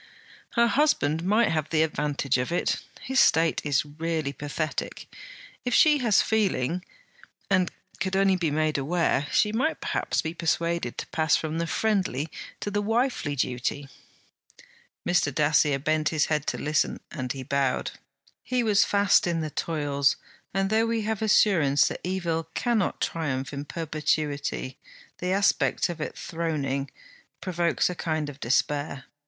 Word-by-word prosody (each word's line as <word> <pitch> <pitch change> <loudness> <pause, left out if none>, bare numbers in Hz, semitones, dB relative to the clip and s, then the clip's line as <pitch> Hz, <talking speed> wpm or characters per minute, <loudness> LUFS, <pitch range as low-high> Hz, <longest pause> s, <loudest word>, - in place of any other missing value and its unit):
'Her 235 -1 +4
husband 170 - +2
might 215 +5 +3
have 155 -1 -1
the 160 -1 +3
advantage 145 -4 0
of 125 +5 -2
it. 175 - +1 0.2
His 265 0 0
state 165 0 +4
is 145 -1 +1
really 155 -1 -3
pathetic. 150 +3 -4 0.6
If 245 -2 0
she 300 -2 +6
has 230 -6 +4
feeling, 185 - 0 0.7
and 185 -2 +3 0.3
could 190 +1 -1
only 195 0 +4
be 170 -3 0
made 155 0 0
aware, 150 -1 +1
she 210 - +3
might 255 +9 0
perhaps - - -1
be 160 0 -3
persuaded 170 -5 -1
to - - -5
pass 155 -1 +2
from 160 +1 -2
the 170 - -1
friendly 185 - 0 0.3
to 205 - -3
the 205 0 0
wifely 225 - 0
duty.' 130 +2 -2 1.2
Mr. 175 -4 +2
Dacier 145 0 +3
bent 155 +2 0
his 155 -2 +1
head 150 -2 -1
to - - -1
listen, 150 0 0
and 130 -6 -4
he 135 -1 -6
bowed. 135 -1 0 0.5
He 250 -1 0
was 210 -2 +4
fast 200 -2 +3
in 170 -1 0
the 155 -1 -4
toils; 145 -4 0 0.4
and 195 +1 0
though 225 +1 +3
we 230 -1 0
have 220 0 -2
assurance 170 -10 +4
that - - -6
evil 170 -3 -2
cannot 230 -5 0
triumph 140 -5 -2
in 140 +1 -5
perpetuity, 150 -4 -2 0.4
the 180 +1 -1
aspect 195 -1 +2
of 170 -2 -5
it - - -5
throning 145 -5 -2 0.5
provokes 175 -2 0
a 180 - -2
kind 155 -3 -2
of 145 0 -10
despair. 145 +2 0
160 Hz, 150 wpm, -26 LUFS, 145-195 Hz, 1.2 s, she